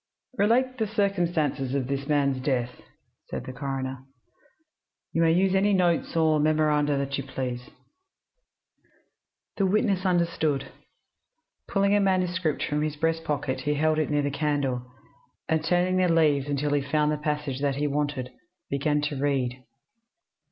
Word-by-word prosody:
"Relate 255 +5 +2
the 220 - +1
circumstances 175 - 0
of 135 -2 0
this 140 +1 -3
man's 140 -3 +1
death," 125 -3 -1 0.5
said - - -4
the 130 - -7
coroner. 135 -1 -4 1.1
"You 165 - +1
may 165 -1 +4
use 185 +3 +3
any 200 +2 +3
notes 175 -4 +1
or 160 -1 +3
memoranda 150 -1 +2
that 140 0 -2
you - - -3
please." 125 -2 -5 1.9
The 195 - +2
witness 200 -1 +1
understood. 170 -6 0 1.0
Pulling 200 0 +2
a 205 - +4
manuscript 185 -4 0
from 150 0 -1
his 155 -1 -1
breast 165 +2 0
pocket 145 -4 -2
he 150 +2 0
held 155 +1 +2
it 155 - 0
near 145 -1 +1
the 145 - -1
candle, 140 -4 -1 0.6
and 160 -1 +1
turning 180 +2 +2
the 185 -1 +3
leaves 150 -4 +3
until 145 0 -1
he 145 - +2
found 150 +2 +1
the 150 - -1
passage 150 -3 -2
that 140 -2 +1
he 145 +2 -1
wanted, 145 -3 -2 0.4
began 145 +2 +1
to 145 -2 -3
read. 130 -3 -1
150 Hz, 150 wpm, -26 LUFS, 140-170 Hz, 1.9 s, may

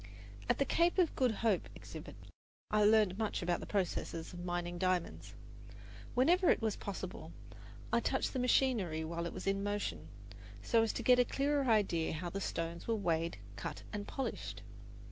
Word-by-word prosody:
At - - +3
the 275 - +2
Cape 340 +5 +2
of 355 -4 +3
Good 255 -2 +3
Hope 220 -3 0
exhibit, - - -9 0.6
I 210 0 +4
learned 210 -2 +4
much 215 -3 -1
about 175 0 +1
the - - -8
processes 180 -4 -2
of 175 0 -7
mining 175 0 -3
diamonds. 185 -2 -1 0.8
Whenever 340 +9 +4
it - - +4
was 220 -2 0
possible, 200 -2 -6 0.6
I - - +5
touched - - 0
the 260 - -1
machinery 235 -10 +2
while 170 +1 -3
it - - -5
was - - -7
in 195 0 +1
motion, 205 0 -2 0.6
so 230 - +4
as 225 - +2
to - - -4
get 250 -1 +6
a - - +7
clearer 275 +1 0
idea 190 -8 +2
how 170 +2 -4
the 195 - -4
stones 165 -1 -3
were 230 - +2
weighed, 170 -5 0 0.2
cut, - - -6
and 205 -1 -4
polished. 270 - -4
205 Hz, 175 wpm, -34 LUFS, 175-245 Hz, 0.8 s, a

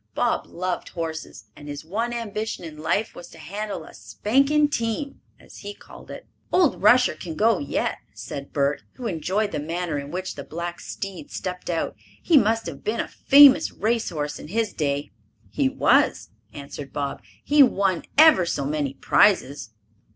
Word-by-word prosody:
Bob - - 0
loved 180 0 -4
horses, 160 - -6
and 145 - -12
his 145 +1 -7
one 225 +8 -2
ambition 220 -4 -4
in 160 -2 -8
life 200 +7 -1
was 175 - -10
to - - -15
handle 205 +2 -5
a - - -14
"spanking 275 +7 +1
team," 255 +1 -3 0.2
as - - -15
he 205 0 -8
called - - -15
it. - - -9 0.3
"Old 355 -7 +3
Rusher 245 +5 +5
can 165 -3 -8
go 220 +2 +3
yet," 140 - -2
said 140 0 -8
Bert, 140 0 0
who 250 - -9
enjoyed 200 +3 -1
the - - -3
manner 165 0 -3
in 140 0 -7
which 185 +3 -4
the 140 - -8
black 170 +3 -6
steed 195 +9 -7
stepped 180 -7 -5
out. 165 -2 -2 0.2
"He 340 - +2
must 225 -3 +3
have 160 -5 -7
been 215 +2 -2
a - - -1
famous 285 +2 +6
race 225 +2 -1
horse 150 -3 -4
in - - -9
his 220 +4 -1
day." 140 -5 -2 0.4
"He 135 +3 +1
was," - - +2 0.2
answered 140 -1 -9
Bob. 140 0 -4 0.2
"He 295 0 +4
won 195 -8 +3 0.2
ever 310 - +7
so 140 -4 -2
many 145 -2 -2
prizes." 145 - +2
185 Hz, 175 wpm, -24 LUFS, 150-225 Hz, 0.4 s, ever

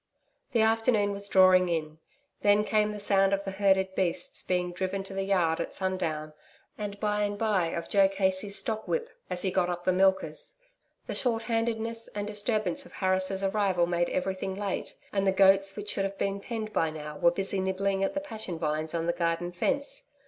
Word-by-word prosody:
The 230 -2 +4
afternoon 220 -2 +2
was 200 0 -3
drawing 185 -2 +5
in. 155 -2 -2 0.4
Then 205 0 +4
came 215 0 +1
the 210 - -6
sound 195 -1 +3
of 195 0 0
the 195 - -4
herded 190 -1 +2
beasts 190 +9 -2
being 180 -1 -1
driven 190 +2 -3
to 195 - -10
the 195 - -2
yard 180 -5 +1
at - - -4
sundown 165 -5 -2 0.4
and, 205 -1 -5
by 210 -1 0
and 205 0 -1
by, 205 -6 +1
of 170 0 -4
Joe 195 -1 +4
Casey's 195 +1 0
stockwhip 275 - -1 0.2
as 180 0 -1
he 190 - 0
got 180 -1 +1
up 175 0 -4
the 185 - +4
milkers. 190 - +1 0.5
The - - -4
shorthandedness 230 -1 -1
and 205 0 -2
disturbance 215 +6 -1
of - - -15
Harris' 190 0 0
arrival 195 -3 +2
made 175 0 0
everything 190 0 -2
late, 200 -1 -3 0.2
and 195 -1 +1
the - - +5
goats 195 0 +4
which 205 0 -4
should 195 - 0
have 195 0 -5
been 200 0 -1
penned 215 0 -5
by 165 - +2
now, 150 -1 -7
were 170 - +6
busy 195 +2 -1
nibbling 195 +1 0
at 280 - -1
the 290 - -1
passion 220 - -6
vines 155 0 -2
on 165 0 -1
the 170 - +1
garden 170 0 -1
fence. 285 - -2
195 Hz, 190 wpm, -28 LUFS, 185-210 Hz, 0.5 s, were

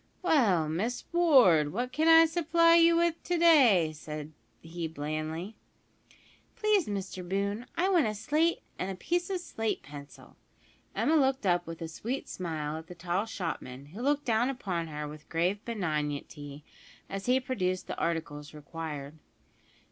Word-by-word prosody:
"Well, 215 - +3
Miss 205 +11 -2
Ward, 250 - +5
what 245 +5 -3
can 310 +5 +1
I 325 0 +8
supply 335 0 +3
you 335 0 +6
with 335 -1 +1
to 355 - -1
day?" 250 - +5
said 150 0 -7 0.3
he 165 0 -5
blandly. 155 +5 -4 1.0
"Please, 425 -5 +2
Mr 190 -2 -4
Boone, 200 +4 -2
I 365 - +2
want 350 - +3
a 215 - -3
slate 310 +10 0 0.2
and 185 - -2
a 190 - -4
piece 350 - -1
of 375 -2 -2
slate 225 -10 -3
pencil." 145 0 -12 0.6
Emma 320 - +2
looked 265 -5 +2
up 175 -2 +1
with 165 0 -6
a - - -4
sweet 235 +11 -5
smile 155 -4 -4
at 160 - -13
the 180 - -10
tall 180 +4 -2
shopman, 150 - -5
who 215 - -7
looked 290 +2 +1
down 235 +2 +2
upon 185 -10 -3
her 150 -1 -5
with 150 +1 -11
grave 180 +5 0
benignity, 150 -7 -4 0.4
as 195 +2 -6
he 255 +1 +4
produced 185 -8 -2
the - - -5
articles 155 -3 -3
required. 150 -1 -7
190 Hz, 155 wpm, -29 LUFS, -, 1.0 s, I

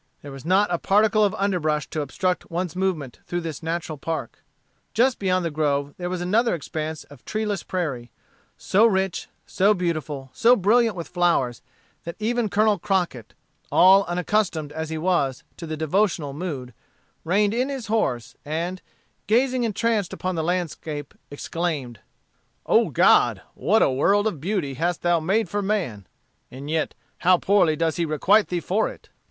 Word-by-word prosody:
There 145 - -8
was 135 +1 -10
not 185 +1 +3
a 170 - 0
particle 215 +2 +3
of 200 - +1
underbrush 160 -7 0
to 155 - -2
obstruct 180 +6 -2
one's 175 +1 -3
movement 175 -9 -2
through 175 0 -2
this 160 -4 -6
natural 165 -2 -4
park. 165 +2 -5 0.5
Just 250 +3 +3
beyond 185 -2 +1
the 165 - -1
grove 145 -2 0
there 175 -1 -4
was 180 -1 -3
another 215 +5 +2
expanse 155 0 -5
of 145 -3 -17
treeless 210 -3 -2
prairie, 140 -10 -3 0.5
so 215 +4 +4
rich, 190 -4 -1 0.2
so 205 +3 +2
beautiful, 155 -7 -3
so 240 +2 +5
brilliant 225 +1 +3
with 170 -2 -6
flowers, 170 -9 +1 0.4
that 170 - -6
even 225 +1 0
Colonel 210 -1 +2
Crockett, 180 - -2 0.4
all 190 +2 +7
unaccustomed 175 -4 -1
as 160 +1 -5
he 160 - -3
was 155 -6 0
to 165 - -7
the 155 0 -4
devotional 160 -2 0
mood, 140 -6 -5 0.5
reined 200 +5 +2
in 250 +4 0
his 270 -4 -4
horse, 170 - -1
and 170 +5 -3 0.5
gazing 250 +3 +2
entranced 220 -3 0
upon 185 0 -3
the 160 -2 -2
landscape, 160 -4 -3 0.2
exclaimed: 145 -6 -4 0.7
"O - - +3
God, - - +4
what - - +2
a - - +3
world 200 +11 +2
of 175 -10 -2
beauty 175 -6 -1
hast 170 +5 -2
thou 175 -1 +3
made 195 +7 +1
for 205 +4 -2
man! 180 - -2 0.4
And 140 +4 -8
yet 160 -1 -1 0.2
how 180 0 +5
poorly 180 -5 +3
does 165 +2 0
he 170 - +1
requite 185 +8 +3
thee 180 - -2
for 205 +6 0
it! - - -14
175 Hz, 165 wpm, -24 LUFS, 155-205 Hz, 0.7 s, all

